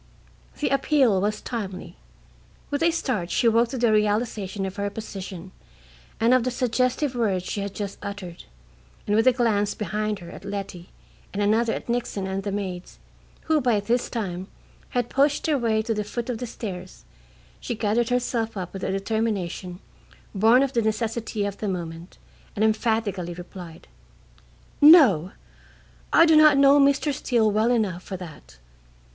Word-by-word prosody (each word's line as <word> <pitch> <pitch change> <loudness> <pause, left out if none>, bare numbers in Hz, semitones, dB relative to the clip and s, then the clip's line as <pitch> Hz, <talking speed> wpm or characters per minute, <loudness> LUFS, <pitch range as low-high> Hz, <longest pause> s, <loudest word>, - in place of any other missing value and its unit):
The 295 - 0
appeal 270 -7 +3
was 210 +1 -1
timely. 200 -6 -6 0.8
With 285 - -1
a 335 - +4
start 255 - -2
she 235 - +2
woke 230 +1 +3
to 260 - -4
the 235 -2 +2
realization 210 -2 0
of 190 +1 -6
her 200 0 -1
position 195 -4 -8 0.7
and 230 +2 +4
of 255 -2 +4
the 255 - 0
suggestive 255 +3 0
words 200 -7 0
she 205 - -3
had 200 0 -5
just 200 -2 -5
uttered, 200 -4 -7 0.6
and 205 - +1
with 225 +3 +3
a - - +8
glance 220 -4 0
behind 215 0 -2
her 175 -2 -11
at - - -11
Letty 195 -3 -6 0.4
and 200 - -5
another 225 +3 +2
at - - -6
Nixon 235 -5 -2
and 190 0 -3
the 200 0 -4
maids, 185 -3 -5 0.4
who 315 -2 +1
by 240 -5 +2
this 235 +4 -1
time 190 -5 -4 0.4
had 245 -2 -1
pushed 280 +3 +1
their 300 -3 +1
way 220 -2 +1
to 225 0 -1
the 210 -1 -2
foot 235 +4 -4
of 230 - -5
the 245 - -4
stairs, 185 - -8 0.5
she - - -4
gathered 225 +2 0
herself 240 -3 -1
up 180 -2 -5
with 195 - -7
a - - -1
determination 195 -3 -2 0.6
born 225 +6 +5
of 275 -1 -2
the 235 - +2
necessity 220 -1 -2
of 200 -1 -5
the 215 - -3
moment 170 -2 -6 0.4
and 215 - +2
emphatically 215 -5 0
replied: 175 - -10 0.9
"No; 260 - +7 0.8
I - - +7
do 320 -1 +5
not 305 -2 +7
know 280 +1 +6
Mr. 280 +1 +3
Steele 235 -6 +1
well 215 +3 +2
enough 210 -8 0
for 190 0 -7
that. 150 - -12
215 Hz, 165 wpm, -24 LUFS, 195-245 Hz, 0.9 s, a